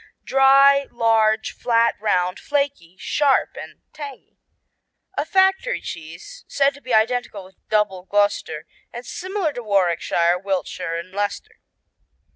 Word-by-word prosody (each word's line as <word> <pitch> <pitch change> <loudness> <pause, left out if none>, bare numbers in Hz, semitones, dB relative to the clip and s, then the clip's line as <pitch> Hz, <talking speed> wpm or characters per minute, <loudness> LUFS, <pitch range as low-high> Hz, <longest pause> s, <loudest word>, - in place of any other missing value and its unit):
Dry, 275 +1 +5
large, 220 -2 +2
flat, 230 -1 +1
round, 180 -3 0
flaky, 280 -12 -2
sharp 280 +6 +1
and - - -10
tangy. 290 -3 -10 0.8
A 295 - -1
factory 385 +7 +2
cheese 170 - -9
said 280 0 +1
to 285 - -15
be - - -8
identical 220 -2 +1
with 185 0 -18
Double 200 -4 0
Gloucester 205 +1 0 0.3
and 240 +1 -8
similar 370 0 -3
to 245 - -6
Warwickshire, 175 -4 +1
Wiltshire 180 -3 -3
and 170 +2 -8
Leicester. 205 +1 -4
225 Hz, 120 wpm, -21 LUFS, 190-280 Hz, 0.8 s, Dry